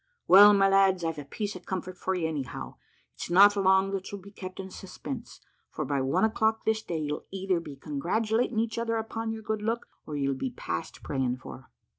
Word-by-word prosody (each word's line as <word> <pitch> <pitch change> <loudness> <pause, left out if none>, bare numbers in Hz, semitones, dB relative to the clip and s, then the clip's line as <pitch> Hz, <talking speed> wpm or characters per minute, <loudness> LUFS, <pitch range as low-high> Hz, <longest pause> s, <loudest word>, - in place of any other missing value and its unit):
Well, 205 +3 +10
my 195 0 +5
lads, 195 -2 +4
I've 165 -2 -2
a - - -6
piece 205 +8 -4
of 180 - -11
comfort 185 -1 -4
for 190 +1 -2
you, 170 -3 0
anyhow. 130 - -5 0.4
It's - - -7
not 200 +4 +7
long 190 0 +3
that 195 -1 -4
you'll 200 - -5
be 200 +2 -13
kept 185 -2 -8
in 190 0 -6
suspense, 230 +7 -8 0.3
for - - -4
by 140 -2 0
one 135 +10 +1
o'clock 220 0 +1
this 220 0 +1
day, 170 -5 -4
you'll 150 -1 -4
either 190 -2 -1
be 150 -4 -9
congratulating 215 - -1
each 225 +1 0
other 230 -1 0
upon 225 0 -3
your 220 0 -6
good 215 0 -2
luck, 230 +2 -1 0.2
or 150 - -5
you'll 140 -1 0
be 130 0 -3
past 85 -8 -5
praying 130 -3 -1
for. 130 +1 -11
190 Hz, 210 wpm, -28 LUFS, 150-220 Hz, 0.4 s, Well